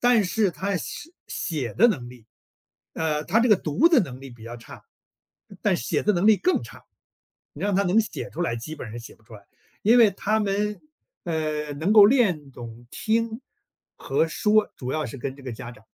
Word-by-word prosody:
但 240 -3 +4
是 200 +2 +1
他 195 +3 -2
是 - - -1
写 295 - -8
写 140 -9 -4
的 225 - +6
能 140 - -1
力 125 -2 -14 0.7
呃， 155 -2 -1
他 200 +9 +2
这 235 0 +3
个 - - +9
读 185 - +1
的 330 -6 +6
能 130 - -5
力 135 -1 -10
比 120 -2 -15
较 115 +1 -8
差， 115 - -13 0.8
但 - - +2
写 - - -1
的 210 - +2
能 175 +3 +1
力 220 -1 +7
更 370 - +1
差， - - -13 0.7
你 - - -12
让 205 -1 0
他 200 - +3
能 195 +3 +3
写 220 - -5
出 165 - -7
来， 140 -9 0
基 155 +7 -7
本 125 -7 -8
上 115 - -7
写 115 - -11
不 - - -29
出 110 +1 -15
来。 105 - -14 0.4
因 230 +4 +5
为 225 -3 +7
他 210 +3 -1
们， 210 0 -1 0.4
呃， 155 -3 -2
能 160 +8 0
够 210 -2 +9
练 190 - +2
懂 120 -1 -11
听 225 +1 -1 0.6
和 140 +4 0
说， 210 +6 +1
主 125 -1 -5
要 155 +2 -1
是 120 - -8
跟 130 +2 -5
这 140 - -14
个 130 -2 -6
家 115 +1 -8
长， 110 -2 -16
170 Hz, 230 characters per minute, -24 LUFS, 130-215 Hz, 0.8 s, 个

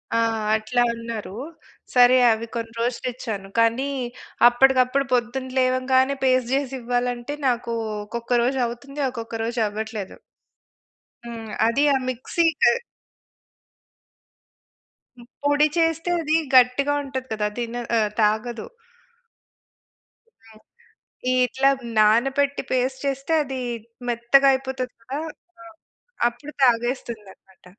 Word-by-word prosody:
ఆ! - - +3 0.4
అట్లా 220 +3 0
అన్నారు. 230 -3 -6 0.6
సరే 250 +1 +7
అవి 220 +1 -1
కొన్ని 230 -1 -4
రోజులిచ్చాను, 235 -4 -3
కానీ 230 +4 +2 0.6
అప్పటికప్పుడు 260 +2 +3
పొద్దున 250 +2 -1
లేవంగానే 260 +1 +2
పేస్ట్ 255 -1 +2
జేసివ్వాలంటే, 245 0 -2
నాకూ 235 -1 -1 0.3
ఒక్కొక్క 235 +2 -1
రోజవుతుంది, 260 +3 -2
ఒకొక్క 230 -1 -8
రోజవ్వట్లేదు. 220 -3 -3 1.1
హ్మ్. 225 -2 -7 0.2
అదీ 275 +5 +2
ఆ - - +3
మిక్సీ 255 +7 -1 0.2
క్ - - +6 2.5
హ్మ్. 240 0 -15 0.2
పొడి 290 +1 +4
చేస్తే 325 +1 +1
అదీ 310 0 +1 0.2
గట్టిగా 255 +3 +4
ఉంటది 260 -1 -5
కదా! 210 -1 -1
తిన 235 0 -4 0.2
ఆహ్, 215 -1 +2
తాగదు. 220 +2 0 1.8
హ్మ్. 220 -1 -18 0.7
ఈ - - +2
ఇట్లా 265 +3 +2 0.3
నానపెట్టి, 270 +6 +3
పేస్ట్ 260 +1 0
చేస్తే 275 +4 -2
అదీ 265 -2 -5 0.5
మెత్తగా 240 +4 +4
అయిపోతది 260 -1 -3
కదా! 265 +5 -5 0.4
ఆ! - - -13 0.6
అప్పుడు 265 +5 -7
తాగేస్తుందనమాట. 230 -6 -2
245 Hz, 100 wpm, -23 LUFS, 230-265 Hz, 2.5 s, సరే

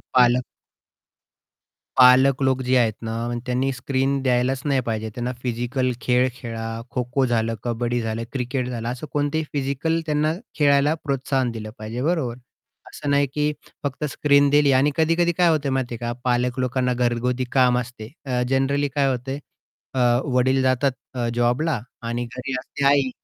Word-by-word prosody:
पालक 125 0 +5 1.6
पालक 130 +1 +6
लोक 130 0 +2
जे 130 +1 +2
आहेत 115 -2 +3
ना, 115 0 -3 0.3
त्यांनी 130 +2 0
स्क्रीन 135 +2 -1
द्यायलाच 130 +1 +1
नाही 140 -2 +2
पाहिजे. 110 -1 -2
त्यांना 125 +1 -3
फिजिकल 125 +1 -1
खेळ 125 +1 +3
खेळा. 115 -3 -5
खोखो 125 +2 0
झालं, 115 -1 0
कबड्डी 120 0 -1
झालं, 115 0 -3
क्रिकेट 125 -1 -2
झालं. 115 -2 -4
असं 125 +5 -5
कोणतेही 145 +2 0
फिजिकल 140 +4 -1
त्यांना 150 +1 +1 0.3
खेळायला 145 0 +4
प्रोत्साहन 135 -2 0
दिलं 110 -2 -6
पाहिजे, 110 +3 -5
बरोबर? 150 -7 0 0.5
असं 145 -1 -4
नाही, 140 0 +3
की 150 0 +1 0.3
फक्त 145 +2 -3
स्क्रीन 140 0 +4
दिली 145 -1 +4
आणि 135 +3 +4
कधी-कधी 165 +2 +2
काय 175 - +5
होत 155 -3 +1
माहिती 130 -3 -1
आहे - - -6
का? 120 - -1
पालक 125 0 +1
लोकांना 125 0 0
घरगुती 125 +1 0
काम 125 -2 +4
असते. 120 -2 -7
अ, 125 -2 0
जनरली 140 +2 +1
काय 140 -2 +2
होते? 135 +2 -3 0.6
अ, - - -1 0.4
वडील 130 +1 +3
जातात 130 +1 +2 0.2
अ, 120 -2 -1
जॉबला 125 +3 +1 0.3
आणि 120 +1 -2
घरी 125 +3 -6
असते 140 +2 -5
आई. 140 -2 +4
130 Hz, 160 wpm, -23 LUFS, 120-140 Hz, 1.6 s, पालक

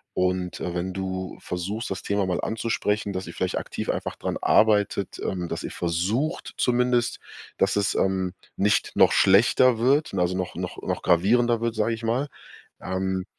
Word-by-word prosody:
und, 90 0 -1
äh, 90 - -3
wenn 90 +2 -2
du 95 -1 -4
versuchst, 100 +6 -4
das 95 - -4
Thema 100 -1 0
mal 90 -2 -1
anzusprechen, 110 -2 -1
dass 95 0 -4
ihr 85 - -8
vielleicht 95 - -2
aktiv - - -5
einfach - - -2
dran - - -3
arbeitet, 105 -3 +2
ähm, 90 -2 -2
dass - - -4
ihr - - -5
versucht 95 - -1
zumindest 125 -1 +2 0.4
dass - - +2
es, 100 -1 +1
ähm, 95 -1 0 0.2
nicht 105 +2 +1
noch - - +6
schlechter 115 +5 +5
wird, 140 +6 +2
also 90 -1 0
noch 90 -1 -3
noch - - -5
noch - - -2
gravierender 115 +7 +3
wird, 115 -1 0
sage 110 +1 +1
ich 115 - -12
mal. 120 +5 0 0.5
Ähm, 95 0 -2
100 Hz, 170 wpm, -25 LUFS, 95-115 Hz, 0.5 s, noch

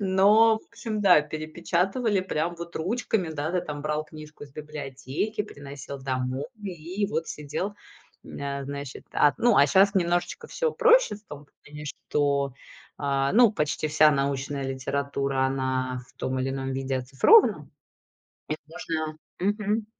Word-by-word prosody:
Но, 205 +4 +5
в - - -21
общем, 225 -2 -4
да, 185 -6 +7
перепечатывали 170 - -1
прям 170 -2 -2
вот 170 0 -8
ручками, 190 0 -1
да, 155 +1 -3
ты 180 -1 0
там 145 -1 -5
брал 150 +1 -1
книжку 155 0 -12
из 145 - -10
библиотеки, 150 - -4
приносил 140 -6 -9
домой 130 0 -2
и 185 +1 -3
вот 165 -5 -2
сидел, 150 +7 -4 0.5
м, - - -10
э, 140 0 -3
значит. 140 -1 -7
А, 145 - +4
ну, 240 -2 +4
а 140 - +7
щас 195 +7 +4
немножечко 175 - 0
всё 485 -2 -1
проще, - - +5
в 205 - -13
том 145 0 -10 0.2
плане, 150 0 -9
что, 140 -1 -1 0.5
а, 140 -1 0
ну, 230 0 +6
почти 150 -4 -1
вся 155 0 +5
научная 140 0 -1
литература, 135 0 -1
она 130 -1 -1
в - - -24
том 130 0 -2
или 130 - -1
ином 135 0 -3
виде 135 0 -2
оцифрована. 135 - +4 0.8
И 155 - 0
можно 155 -1 -4 0.2
мгм. 210 +2 0
150 Hz, 150 wpm, -26 LUFS, 140-195 Hz, 0.8 s, да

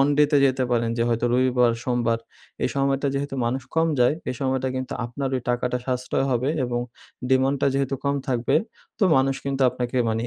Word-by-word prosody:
অনডে 145 +2 +4
তে 145 - +4
যেতে 130 0 +1
পারেন 115 -1 +1
যে - - +3
হয়তো 115 0 +1
রবিবার, 125 -1 +3
সোমবার 120 -2 +1 0.4
এই - - +2
সময়টা 135 0 +1
যেহেতু 140 0 -2
মানুষ 130 +2 -1
কম 165 0 +3
যায় 125 +4 +4 0.2
এই - - -4
সময়টা 130 -1 0
কিন্তু 130 0 -4
আপনার 135 +3 -3
ওই - - -2
টাকাটা 125 0 0
সাশ্রয় 125 +1 -1
হবে 125 +2 +1 0.2
এবং 120 -1 -1 0.5
ডিমান্ডটা 135 +1 +2
যেহেতু 135 0 0
কম 140 - +1
থাকবে 120 -2 +1 0.4
তো 205 - +3
মানুষ 135 0 +2
কিন্তু 135 -1 -1
আপনাকে 125 +1 -4
মানে 115 +1 -1
130 Hz, 185 wpm, -24 LUFS, 120-135 Hz, 0.5 s, অনডে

